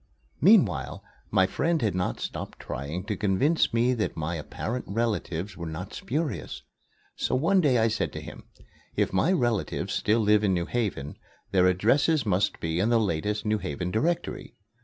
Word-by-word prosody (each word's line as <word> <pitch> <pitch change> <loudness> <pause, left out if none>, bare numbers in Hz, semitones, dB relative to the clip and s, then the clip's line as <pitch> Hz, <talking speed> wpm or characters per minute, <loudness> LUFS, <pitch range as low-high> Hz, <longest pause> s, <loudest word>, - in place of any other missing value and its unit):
Meanwhile, 165 - +4 0.3
my 95 -2 +4
friend 165 - 0
had 105 - +1
not 90 -9 -2
stopped - - -6
trying 75 +7 -5
to 105 +1 -3
convince 105 - +2
me 120 +2 +2
that 110 -4 -2
my 80 +2 -2
apparent 110 +9 -4
relatives 105 -4 -2
were 85 -1 -6
not 90 +5 -6
spurious; 150 +3 -3 0.5
so - - -1
one 170 +8 +3
day 135 -6 +3
I 115 0 +3
said 110 - -1
to - - -5
him: - - -10 0.5
"If - - 0
my 95 - +3
relatives 120 - 0
still 110 +2 +2
live 105 0 +4
in 95 -3 +2
New 85 -1 -1
Haven, 95 - -3 0.3
their 90 -1 +4
addresses 120 - +3
must 100 -1 +1
be 80 +1 -2
in 105 +5 +2
the 120 -1 +4
latest 105 +2 -1
New 105 0 +1
Haven 90 +3 -4
Directory. 165 - -2
105 Hz, 170 wpm, -27 LUFS, 90-120 Hz, 0.5 s, Meanwhile